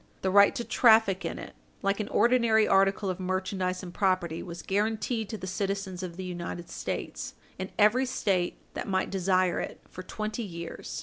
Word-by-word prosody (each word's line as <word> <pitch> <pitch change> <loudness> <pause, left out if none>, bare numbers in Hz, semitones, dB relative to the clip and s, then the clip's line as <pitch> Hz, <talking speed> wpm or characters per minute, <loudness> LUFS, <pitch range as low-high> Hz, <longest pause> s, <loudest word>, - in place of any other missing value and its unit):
The 190 - +1
right 200 +1 +6
to 240 - -2
traffic 220 -6 +4
in - - -3
it, - - -8 0.3
like 195 +1 +1
an 210 - -2
ordinary 235 -3 +4
article 195 0 +3
of 185 - -6
merchandise 185 0 -2
and 175 -1 -8
property, 185 -4 0
was 170 -1 -8
guarantied 215 +2 -1
to 220 - -4
the 185 - -7
citizens 195 0 -3
of 180 -2 -6
the 190 - -5
United 175 -1 -6
States - - -5 0.2
in 190 +1 -4
every 230 +5 +4
State 185 -7 0 0.2
that - - -5
might 190 -1 0
desire 185 -1 +2
it - - -5
for 185 - -9
twenty 215 +4 -4
years. 170 -5 -6
195 Hz, 180 wpm, -28 LUFS, 185-215 Hz, 0.3 s, right